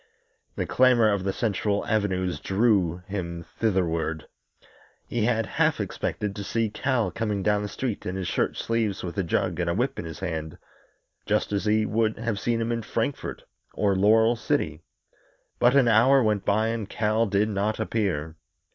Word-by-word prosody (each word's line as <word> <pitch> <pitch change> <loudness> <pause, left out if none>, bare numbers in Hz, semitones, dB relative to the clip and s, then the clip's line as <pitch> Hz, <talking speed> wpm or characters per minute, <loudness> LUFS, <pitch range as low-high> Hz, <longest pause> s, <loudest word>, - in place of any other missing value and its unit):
The - - -2
clamor 125 -4 +4
of 100 -2 -1
the 95 - +1
central 100 0 -1
avenues 95 -4 0
drew 95 -5 +1
him 85 -4 -5 0.2
thitherward. 85 -7 0 0.8
He 115 -3 -1
had 115 -2 +1
half - - +1
expected 105 -1 -3
to 100 - -5
see 115 +1 -1
Cal 120 -3 0
coming 105 -2 -2
down 105 0 +2
the 105 - -3
street 110 +1 -4
in 90 - -3
his 95 -2 -3
shirt - - -1
sleeves, 115 -4 -1
with 85 -2 -5
a - - +1
jug 85 - -1
and 85 -1 0
a 85 - 0
whip 125 +6 -1
in - - -5
his 80 +1 -8
hand, 80 -4 -4 0.7
just - - +1
as 100 +1 -1
he 110 0 +2
would 110 0 0
have 115 -3 -2
seen 115 +1 0
him 115 +1 -1
in 115 0 -1
Frankfort - - -3 0.3
or 100 -2 +2
Laurel 110 +4 +4
City. 100 - -1 0.8
But 120 +2 +4
an 135 -3 +5
hour 125 +4 +5
went 105 -3 0
by 110 +2 +2
and 115 -3 -3
Cal 110 +1 +1
did 100 +2 +1
not 105 +1 -1
appear. 80 -8 -2
105 Hz, 175 wpm, -26 LUFS, 95-115 Hz, 0.8 s, an